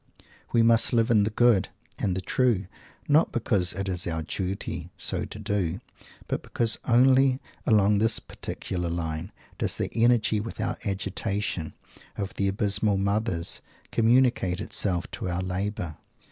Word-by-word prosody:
We 115 -1 +4
must 115 +1 +4
live 115 -1 +3
in 105 -3 +5
"the - - 0
good" 110 -3 +3 0.3
and 95 -2 0
"the - - -2
true," 115 -2 +1 0.4
not 150 +3 +4
because 100 -6 0
it 95 +2 -3
is 90 -2 -2
our 80 -1 -2
"duty" 90 -1 -4
so - - -2
to - - -8
do, 95 -4 -1 0.5
but - - -2
because 115 -1 0
only 130 +2 +5 0.3
along 105 -2 +4
this 110 +1 +3
particular 90 -2 -5
line 85 +2 -3 0.3
does - - 0
the - - -2
"energy 115 -1 +3
without 110 0 -4
agitation" 100 -3 -2 0.4
of 100 -2 -3
the 100 - 0
"abysmal 100 0 +1
mothers" 100 -3 0 0.3
communicate 115 -6 +3
itself 95 -4 -1
to 95 - -4
our 90 +1 -1
labour. 90 -3 -3
100 Hz, 145 wpm, -27 LUFS, 90-115 Hz, 0.5 s, in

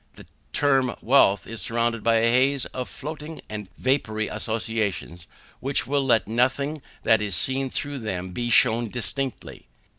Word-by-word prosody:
The - - -14 0.3
term 135 -4 +2
wealth 115 -6 +4
is 115 -1 -6
surrounded 115 -1 0
by 115 0 +3
a 115 +1 +3
haze 130 +2 +3
of 125 -1 -6
floating 155 +2 -7
and 105 -3 -7
vapoury 110 -5 0
associations, 105 -6 -3 0.3
which 135 +2 +2
will 140 0 0
let 115 -7 +2
nothing 130 +6 0 0.2
that 110 -1 +4
is 100 -3 -1
seen 135 +8 0
through 145 +2 -3
them 95 -5 -4
be 120 +5 -3
shewn 115 0 +4
distinctly. 125 - -4
120 Hz, 150 wpm, -24 LUFS, 110-135 Hz, 0.3 s, wealth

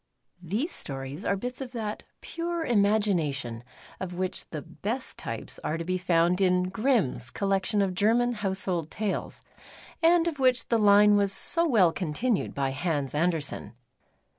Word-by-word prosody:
THESE 215 - -2
stories 135 +4 -6
are 200 - +2
bits 245 +6 -5
of 255 -1 -6
that 215 -3 -4 0.2
pure 335 0 -3
imagina 205 -7 +2
tion 120 -4 -6 0.4
of 180 -1 -5
which 185 0 -2
the 150 -3 -6
best 240 +6 -5
t\ - - -5
pes - - -10
are 155 - -1
to 165 - -5
be 185 +1 -1
found 175 +1 +2
in 180 -1 +2
Grimm's 195 - +1
Collection 195 - 0
of 190 -2 -1
German 230 +6 +2
Household 190 -6 -2
Tales, 210 +1 -3 0.6
and 340 0 +4
of 310 -4 -3
which 255 -1 +3
the 230 - +3
line 205 0 +6
was 200 -1 +2
so 335 - +2
well 195 - +4
continued 195 +7 -1
by 135 -1 0
Hans 145 -1 -2
Andersen. 160 -4 -1
195 Hz, 160 wpm, -27 LUFS, 170-230 Hz, 0.6 s, line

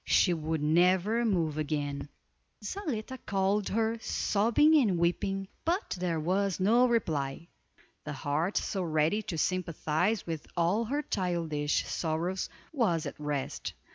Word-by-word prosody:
She 180 - +4
would 160 -1 -2
never 180 +8 +3
move 165 -8 +1
again. 145 -2 -2 0.5
Zaletta 260 - -4
called 195 +1 +1
her, 225 +1 0
sobbing 235 +9 +3
and 210 - +3
weeping, 195 +3 0 0.2
but 355 +5 -1
there 175 -3 0
was 190 +4 0
no 235 +6 +5
reply. 160 - -1 0.5
The 150 - -5
heart 150 +7 -1
so 195 - -1
ready 160 +4 +1
to 200 -6 -5
sympathize 180 +3 0
with 160 -3 -5
all 180 +7 +2
her 285 +6 -1
childish 165 - -1
sorrows 170 +3 -2 0.2
was 190 - +1
at - - -6
rest. 145 -2 -3
180 Hz, 130 wpm, -30 LUFS, 155-215 Hz, 0.5 s, no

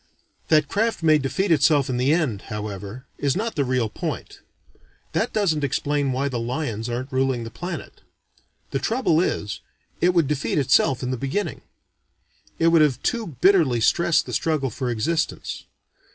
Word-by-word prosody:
That 155 -2 +4
craft 220 -1 -1
may 155 -1 +5
defeat 175 +8 -1
itself 145 -2 +4
in 125 - -2
the 130 +3 +2
end, 150 - +1
however, 105 +3 -6
is 140 -2 +1
not 225 +4 -2
the 145 - 0
real 125 -3 0
point. - - -5 0.7
That - - 0
doesn't 165 -8 +1
explain 140 0 0
why 135 +2 0
the 125 -4 -2
lions 115 -2 -3
aren't 125 +4 -4
ruling 130 -2 +1
the 115 - -7
planet. 175 +5 -7 0.7
The - - -1
trouble 225 -9 +1
is, 105 - -2 0.4
it 180 +1 +3
would 165 -5 +3
defeat 150 +1 -1
itself 135 -1 +3
in 125 - -2
the 130 - -2
beginning. 155 - -3 1.0
It 165 - +4
would 165 -1 +5
have 140 -5 +3
too 235 -4 -1
bitterly 165 -11 +4
stressed 170 +8 +3
the - - -7
struggle 150 -5 0
for 125 +3 -3
existence. 155 +8 -2
140 Hz, 165 wpm, -23 LUFS, 125-165 Hz, 1.0 s, may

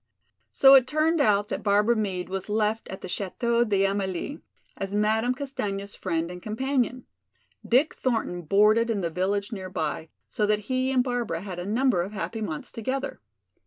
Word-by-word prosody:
So 270 0 +7
it 260 -2 +7
turned 310 +3 +2
out 205 -4 +3
that - - -3
Barbara 210 +3 +3
Meade 190 -5 -2
was 190 +2 -5
left 215 +1 0
at 190 - -8
the - - -6
Chateau 235 +6 0
d'Amélie, 195 - -1 0.3
as 195 +1 -4
Madame 220 +4 +2
Castaigne's 205 -8 -4
friend 170 -2 -2
and 180 0 -8
companion. 255 +3 -1 0.6
Dick 265 +6 +3
Thornton 225 -8 -1
boarded 210 +7 +4
in 210 -3 0
the 170 -2 -2
village 200 +4 -1
near 190 -4 -5
by, 160 -2 -3 0.2
so 210 - -1
that 210 0 +1
he 255 +1 +1
and 255 -2 +3
Barbara 240 -10 -2
had 185 -3 -6
a 175 - -5
number 230 -3 +2
of 195 +4 -5
happy 220 +2 -4
months 160 -8 -5
together. 260 +4 -4
210 Hz, 170 wpm, -26 LUFS, 190-245 Hz, 0.6 s, So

